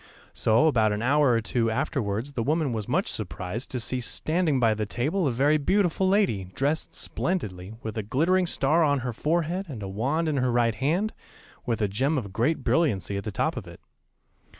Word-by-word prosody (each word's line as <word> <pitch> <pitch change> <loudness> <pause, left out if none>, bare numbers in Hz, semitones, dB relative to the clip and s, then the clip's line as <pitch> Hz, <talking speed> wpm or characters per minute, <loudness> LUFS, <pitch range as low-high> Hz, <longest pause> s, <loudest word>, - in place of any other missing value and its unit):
] - - -25
So 115 +6 +3
about 115 -8 +3
an 105 +2 -3
hour 145 +2 +4
or 115 -2 +3
two 115 +1 0
afterwards 115 -1 -2
the 120 - -2
woman 150 +1 0
was 110 -2 -3
much - - +1
surprised 95 +7 -5
to 125 - -3
see 125 +2 -2
standing 155 +2 0
by 115 -3 +4
the 110 -1 -3
table 150 - 0
a - - +1
very 145 +6 +3
beautiful 190 +3 +2
lady, 190 - +2
dressed 145 +4 -1
splendidly, 105 - -2
with 110 -1 -5
a - - 0
glittering 170 - +1
star 155 +2 +2
on 145 -3 +2
her 125 -1 -3
forehead 170 - -1
and 115 -7 -6
a - - -4
wand 135 +12 -1
in 150 -2 0
her 125 -1 +1
right 120 -1 +2
hand, 170 - 0 0.5
with 115 -3 0
a - - +3
gem 135 +10 0
of 100 -7 -4
great 125 +10 0
brilliancy 100 - +1
at 100 - -4
the 105 - -3
top - - -1
of - - -6
it. - - -12
130 Hz, 205 wpm, -26 LUFS, 110-155 Hz, 0.5 s, hour